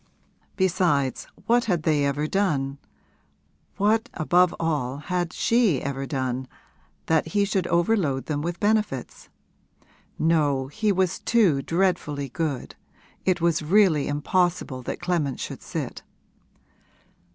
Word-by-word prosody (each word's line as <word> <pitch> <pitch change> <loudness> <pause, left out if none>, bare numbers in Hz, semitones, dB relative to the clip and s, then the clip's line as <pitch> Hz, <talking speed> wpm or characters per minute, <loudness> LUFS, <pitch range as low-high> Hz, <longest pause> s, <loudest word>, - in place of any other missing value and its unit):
Besides, 170 -8 +1 0.2
what 240 +1 +3
had 175 -7 0
they 150 -2 +2
ever 145 +2 -1
done 145 -7 0 1.0
what 215 +3 +2
above 175 +3 +3
all 145 -6 -1
had 175 +3 -2
she 225 - +2
ever 135 0 -4
done, 130 -2 -2 0.6
that 160 -1 +2
he 200 +5 +1
should 195 -3 -1
overload 170 -6 +1
them 145 -2 -2
with 170 +2 -4
benefits? 210 - -1 0.9
No, 145 -5 +1
he 215 +7 0
was 185 -2 0
too 195 -12 +3
dreadfully 165 -4 -1
good; 145 -2 -3 0.5
it 185 -2 +1
was 170 -2 +2
really 165 -2 +3
impossible 150 -2 0
that 125 - -5
Clement 170 -7 -1
should - - -6
sit. - - -5
165 Hz, 120 wpm, -25 LUFS, 140-185 Hz, 1.0 s, what